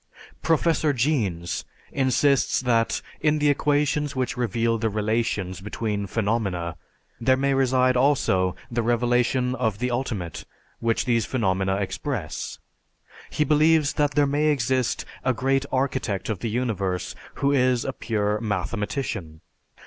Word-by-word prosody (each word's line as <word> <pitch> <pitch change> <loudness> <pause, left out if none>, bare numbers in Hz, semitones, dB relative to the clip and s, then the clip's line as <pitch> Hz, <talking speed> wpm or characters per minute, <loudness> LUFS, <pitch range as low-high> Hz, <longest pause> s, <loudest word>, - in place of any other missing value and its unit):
Professor 160 -2 +2
Jeans 105 - -1 0.3
insists 135 +1 +2
that 115 -3 +1 0.2
in 155 0 +2
the 150 -1 +3
equations 145 0 +1
which 130 +3 -1
reveal 115 -1 0
the 110 0 0
relations 105 -3 -1
between 105 0 -3
phenomena, 100 -6 -1 0.4
there 130 +2 +3
may 140 +1 +1
reside 130 -1 +3
also 125 -9 +2 0.2
the 120 0 0
revelation 120 +2 +1
of 110 -6 -1
the 125 +2 -1
ultimate 115 -9 -3 0.4
which 115 -1 0
these 115 -3 +1
phenomena 95 -5 0
express. 100 - -4 0.7
He 150 - +1
believes 150 0 +3
that 145 -2 0
there 145 - +4
may 145 +2 +1
exist 130 -3 +1 0.2
"a 130 -1 +1
great 135 +3 +1
architect 130 -7 -1
of 105 -5 -2
the 115 - -2
universe 105 -6 -2 0.2
who 140 - +1
is 125 -3 +2
a - - -2
pure 105 -2 -1
mathematician." 105 - -3
120 Hz, 130 wpm, -24 LUFS, 105-135 Hz, 0.7 s, there